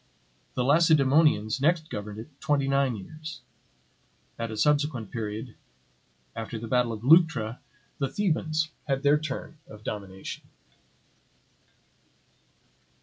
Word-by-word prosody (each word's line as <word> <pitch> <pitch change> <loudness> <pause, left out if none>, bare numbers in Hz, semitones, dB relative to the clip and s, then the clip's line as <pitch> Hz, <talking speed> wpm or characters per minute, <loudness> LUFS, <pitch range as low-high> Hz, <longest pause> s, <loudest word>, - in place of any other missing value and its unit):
The 125 - +1
Lacedaemonians 145 -5 +4
next 160 +1 +2
governed 105 0 -5
it 135 +6 -11
twenty 140 -2 +1
nine 135 -2 +2
years; 155 +10 -9 1.0
at 115 0 -2
a 110 - -6
subsequent 145 -5 +1
period, 110 +1 -4 0.8
after 115 0 -5
the 115 +1 -6
battle 125 0 +2
of 110 0 -6
Leuctra, 140 -7 +4 0.4
the 135 -2 0
Thebans 160 -5 0 0.2
had 135 -1 0
their 145 +1 +5
turn 155 +1 -6
of 105 0 -12
domination. 95 -3 -6
135 Hz, 110 wpm, -27 LUFS, 110-155 Hz, 1.0 s, their